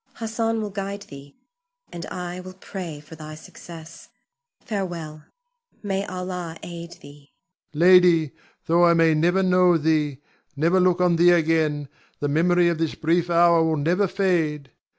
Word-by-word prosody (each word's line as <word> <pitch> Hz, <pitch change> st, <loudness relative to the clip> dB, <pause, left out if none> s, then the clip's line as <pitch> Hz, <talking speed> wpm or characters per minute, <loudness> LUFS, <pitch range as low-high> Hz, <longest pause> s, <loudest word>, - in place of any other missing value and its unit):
Hassan 225 Hz, 0 st, -2 dB
will 210 Hz, -, -5 dB
guide 200 Hz, 0 st, -5 dB
thee, 140 Hz, -6 st, -13 dB, 0.6 s
and 170 Hz, -2 st, -7 dB
I 180 Hz, 0 st, -6 dB
will 185 Hz, 0 st, -10 dB
pray 180 Hz, -5 st, -8 dB
for 150 Hz, -, -15 dB
thy 155 Hz, 0 st, -10 dB
success. 165 Hz, +1 st, -13 dB, 0.5 s
Farewell! 170 Hz, -7 st, -6 dB, 0.6 s
May 195 Hz, -1 st, -2 dB
Allah 180 Hz, -2 st, -6 dB
aid 170 Hz, 0 st, -8 dB
thee! 145 Hz, 0 st, -16 dB, 0.4 s
Ion. -, -, -5 dB
Lady, 175 Hz, -4 st, +5 dB, 0.3 s
though 170 Hz, +1 st, +3 dB
I 170 Hz, -1 st, +5 dB
may 165 Hz, -1 st, +4 dB
never 175 Hz, +5 st, +2 dB
know 180 Hz, -1 st, +4 dB
thee, 150 Hz, -3 st, 0 dB, 0.4 s
never 165 Hz, +6 st, +2 dB
look 180 Hz, -1 st, +2 dB
on 175 Hz, -2 st, +2 dB
thee 175 Hz, +1 st, +5 dB
again, 160 Hz, -4 st, +1 dB, 0.3 s
the 145 Hz, -, -2 dB
memory 175 Hz, +4 st, +2 dB
of 170 Hz, -2 st, -1 dB
this 165 Hz, -2 st, -2 dB
brief 170 Hz, +2 st, 0 dB
hour 170 Hz, -1 st, +4 dB
will 160 Hz, -1 st, 0 dB
never 175 Hz, +7 st, +1 dB
fade. 160 Hz, -8 st, -1 dB
170 Hz, 150 wpm, -23 LUFS, 155-180 Hz, 0.6 s, Lady